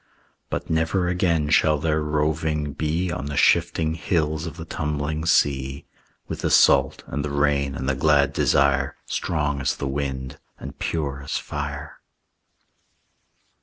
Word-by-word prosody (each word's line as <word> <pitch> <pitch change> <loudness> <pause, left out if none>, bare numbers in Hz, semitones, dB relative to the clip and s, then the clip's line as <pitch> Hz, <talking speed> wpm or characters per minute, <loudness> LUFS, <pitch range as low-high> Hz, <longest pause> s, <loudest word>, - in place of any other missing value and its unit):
But - - -3
never 80 +3 +1
again 85 -4 +1
shall 80 -2 +4
their 80 0 0
roving 75 0 -1
be 80 +5 -1
On 70 -3 -4
the 70 -1 -4
shifting 80 -1 +3
hills 80 -2 -1
of 80 - -8
the 80 - -7
tumbling 75 0 -3
sea, 70 -2 +1 0.4
With - - -5
the - - -1
salt, 70 0 +4
and 70 +2 -4
the 75 - -3
rain, 70 -1 +1
and 65 - -4
the 70 - +2
glad 70 0 +3
desire 70 +1 +2
Strong 75 -2 -1
as 65 0 0
the - - -4
wind 65 -1 -4 0.2
and 70 0 -9
pure 70 -4 -2
as 70 - -2
fire. 75 0 -6
75 Hz, 145 wpm, -23 LUFS, 70-80 Hz, 0.4 s, shall